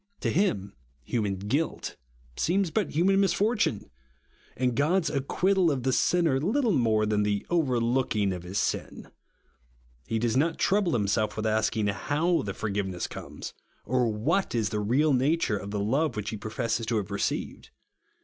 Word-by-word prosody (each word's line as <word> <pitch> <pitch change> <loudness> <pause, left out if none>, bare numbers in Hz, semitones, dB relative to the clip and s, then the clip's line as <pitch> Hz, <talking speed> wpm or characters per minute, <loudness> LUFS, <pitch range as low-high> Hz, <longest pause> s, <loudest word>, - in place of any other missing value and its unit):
To - - 0
him 105 - 0 0.3
human 105 - -1
guilt 115 +12 -2 0.4
seems 185 0 +1
but 210 -3 0
human 195 +4 +3
misfortune, 200 - +1 0.7
and 125 -1 +1
God's 160 +5 +2
ac 140 - 0
quittal 190 -2 +3
of 130 -4 -2
the 130 0 +1
sinner 165 -5 +2
liltle 220 - +1
more 110 -4 +2
than 105 -1 +1
the 105 -1 0
overlookino^ 120 - +1
of 90 - -7
his 90 +3 -5
sin. - - -2 1.0
He 115 - -1
does 115 0 0
not 160 +5 +2
trouble 195 -4 +2
himself 105 0 0
with 110 - -2
asking 110 0 +1
how 150 - +1
the 100 -1 -5
for 110 - -3
giveness 95 -3 -2
comes, - - -8 0.3
or 125 +2 +1
tuhat 125 - 0
is 110 -4 +1
the 105 - -2
real 135 +9 +2
nature 135 -2 +2
of 100 0 -7
the 105 0 -2
love 135 +10 +1
which 105 -1 -3
he - - -4
professes 110 +2 -2
to 115 - +1
have 100 -1 -3
received. 100 - -3
120 Hz, 165 wpm, -27 LUFS, 105-165 Hz, 1.0 s, human